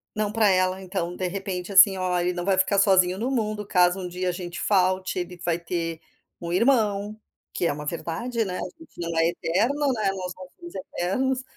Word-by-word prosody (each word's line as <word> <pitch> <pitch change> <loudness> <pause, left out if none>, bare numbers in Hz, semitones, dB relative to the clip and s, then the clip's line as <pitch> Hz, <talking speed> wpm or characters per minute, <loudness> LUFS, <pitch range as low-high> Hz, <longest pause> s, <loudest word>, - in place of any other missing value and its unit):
não 210 -1 -1
para 220 -1 +3
ela, 185 0 +2
então, 180 -2 -3
de 185 - -2
repente, 190 0 -4
assim: 190 0 +8
"Ó, 180 -1 0
ele 175 +1 +1
não 175 0 -4
vai 195 -1 +2
ficar 195 +1 +3
sozinho 185 -2 +4
no 245 +5 -2
mundo, 215 -4 -1
caso 180 0 +3
um 180 - -4
dia 180 +1 -2
a - - +1
gente 175 -1 -6
falte, 185 -2 +1
ele 180 0 -5
vai 175 0 0
ter 165 -1 -3 0.4
um 170 0 -4
irmão." 215 -2 +2 0.3
Que 170 - 0
é - - 0
uma 150 0 -7
verdade, 225 +9 -2
né, 185 -1 -4
a - - -4 0.2
gente 325 - -17
não 170 -1 -3
é 165 - +4
eterno, 235 - 0
né, 215 -4 0
nós 185 -2 -5
não 185 -1 -10
somos 345 -1 -11
eternos. 255 +5 -1
185 Hz, 215 wpm, -25 LUFS, 180-210 Hz, 0.4 s, assim